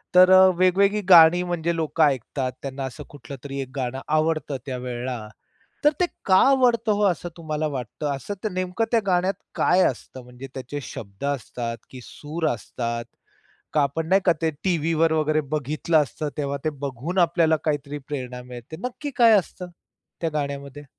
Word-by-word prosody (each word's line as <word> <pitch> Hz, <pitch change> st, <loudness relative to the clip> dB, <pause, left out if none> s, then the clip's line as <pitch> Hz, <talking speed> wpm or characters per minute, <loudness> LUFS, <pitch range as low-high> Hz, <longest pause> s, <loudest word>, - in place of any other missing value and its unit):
तर 185 Hz, +1 st, +8 dB
अ, 185 Hz, 0 st, +9 dB
वेगवेगळी 195 Hz, +3 st, +3 dB
गाणी 170 Hz, +1 st, +8 dB
म्हणजे 170 Hz, 0 st, -1 dB
लोकं 160 Hz, 0 st, +1 dB
ऐकतात, 135 Hz, -2 st, 0 dB
त्यांना 135 Hz, 0 st, -5 dB
असं 130 Hz, -2 st, -6 dB
कुठलं 145 Hz, -1 st, -10 dB
तरी 140 Hz, -1 st, -5 dB
एक 130 Hz, -, -6 dB
गाणं 130 Hz, -1 st, -3 dB, 0.2 s
आवडतं 155 Hz, -3 st, 0 dB
त्यावेळेला. 125 Hz, -1 st, -4 dB, 0.7 s
तर 295 Hz, -, +7 dB
ते 360 Hz, -, +4 dB, 0.2 s
का 190 Hz, -1 st, +5 dB
आवडतं 240 Hz, -4 st, +3 dB
हो, 205 Hz, -, 0 dB
असं 175 Hz, 0 st, -4 dB
तुम्हाला 155 Hz, -2 st, -3 dB
वाटतं? 125 Hz, +4 st, -5 dB
असं 205 Hz, +9 st, -6 dB
ते 215 Hz, -, +2 dB
नेमकं 185 Hz, +4 st, -1 dB
त्या 230 Hz, -, +4 dB
गाण्यात 185 Hz, +1 st, +2 dB, 0.2 s
काय 185 Hz, +1 st, +3 dB
असतं? 130 Hz, 0 st, -5 dB
म्हणजे 125 Hz, +2 st, -10 dB
त्याचे 135 Hz, +2 st, -5 dB
शब्द 100 Hz, -1 st, -9 dB
असतात 120 Hz, -4 st, -3 dB
की 130 Hz, -, -10 dB
सूर 155 Hz, +6 st, -5 dB
असतात? 115 Hz, +1 st, -4 dB, 0.7 s
का 150 Hz, -, +3 dB
आपण, 150 Hz, +3 st, -1 dB
नाही 190 Hz, +3 st, +4 dB
का, 175 Hz, -, +6 dB
ते 160 Hz, -, +2 dB
टीव्हीवर 165 Hz, -2 st, +2 dB
वगैरे 155 Hz, 0 st, +1 dB
बघितलं 155 Hz, +2 st, 0 dB
असतं, 150 Hz, +2 st, -5 dB
तेव्हा 140 Hz, -1 st, -2 dB
ते 155 Hz, -, +1 dB, 0.2 s
बघून 140 Hz, +8 st, -4 dB
आपल्याला 165 Hz, -2 st, +3 dB
काहीतरी 145 Hz, -1 st, -2 dB
प्रेरणा 125 Hz, -4 st, -5 dB
मिळते, 125 Hz, +4 st, -10 dB
नक्की 285 Hz, +3 st, -7 dB
काय 230 Hz, -2 st, +7 dB
असतं 180 Hz, 0 st, -4 dB, 0.5 s
त्या 165 Hz, -, 0 dB
गाण्यामध्ये? 140 Hz, -1 st, -4 dB
155 Hz, 165 wpm, -24 LUFS, 135-175 Hz, 0.7 s, अ